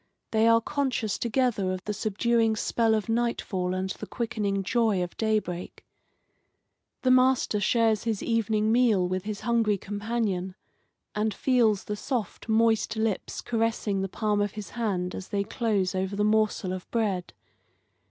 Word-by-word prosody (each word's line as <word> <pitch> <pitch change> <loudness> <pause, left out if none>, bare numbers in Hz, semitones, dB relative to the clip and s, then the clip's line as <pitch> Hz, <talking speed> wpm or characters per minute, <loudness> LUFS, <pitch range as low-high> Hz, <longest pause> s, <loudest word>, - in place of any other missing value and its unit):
They 220 0 +3
are 230 0 +5
conscious 260 -5 -1
together 235 -5 +1
of 185 0 -4
the 210 - -3
subduing 225 +2 +1
spell 225 +1 +1
of 215 0 -2
nightfall 225 -6 -1
and 190 0 -2
the - - -7
quickening 205 -4 -2
joy 220 -3 +1
of 175 - -7
daybreak. 210 -5 -2 1.2
The 255 - +4
master 255 -4 +3
shares 225 +1 +2
his 220 -3 -1
evening 220 -1 +1
meal 225 -6 +3
with 185 +1 -3
his 210 -1 -4
hungry 225 -2 +2
companion, 205 -2 -2 0.6
and 210 -1 -1
feels 230 -6 +2
the 210 - -4
soft, 230 0 -4
moist 225 0 +2
lips 220 -3 -2
caressing 225 -4 -1
the 195 - -2
palm 210 +1 0
of 205 -1 -1
his 210 -2 -7
hand 190 -6 -2
as 190 - -6
they 200 -1 -1
close 205 -4 0
over 190 +1 -2
the 205 - +1
morsel 215 -3 +1
of 185 -1 -7
bread. 200 -6 -1
215 Hz, 150 wpm, -27 LUFS, 195-230 Hz, 1.2 s, are